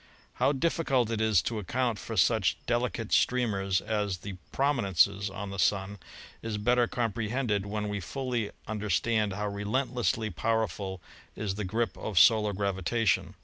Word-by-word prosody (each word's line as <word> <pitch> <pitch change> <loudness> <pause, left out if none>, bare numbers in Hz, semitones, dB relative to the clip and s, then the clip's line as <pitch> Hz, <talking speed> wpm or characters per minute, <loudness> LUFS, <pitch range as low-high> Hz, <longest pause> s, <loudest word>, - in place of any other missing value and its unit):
How - - +5
difficult 135 -5 +1
it 110 -1 -1
is 110 -6 +3
to 115 -2 -2
account 120 +2 -1
for 115 - -6
such 110 +2 +3
delicate 120 -2 -1
stream 125 -3 +2
ers 95 -1 0
as 105 -3 -1
the 100 +3 -7 0.2
"prominences" 100 - +2
on 100 +1 -6
the 95 - -6
Sun 100 0 +1 0.4
is 115 -2 -3
better 120 +3 +3
compre 115 -3 -2
hended 110 -5 0
when 105 0 -2
we 105 0 -2
fully 120 +2 -3 0.2
understand 105 0 0
how 105 +1 -2
relentlessly 110 +2 -1
power 110 +4 +1
ful 95 -2 -6 0.3
is 105 -3 -2
the 105 +1 -4
grip 115 +5 -1
of 105 -4 -5
solar 105 +4 +6
gravitation. 100 +3 0
105 Hz, 155 wpm, -29 LUFS, 100-120 Hz, 0.4 s, solar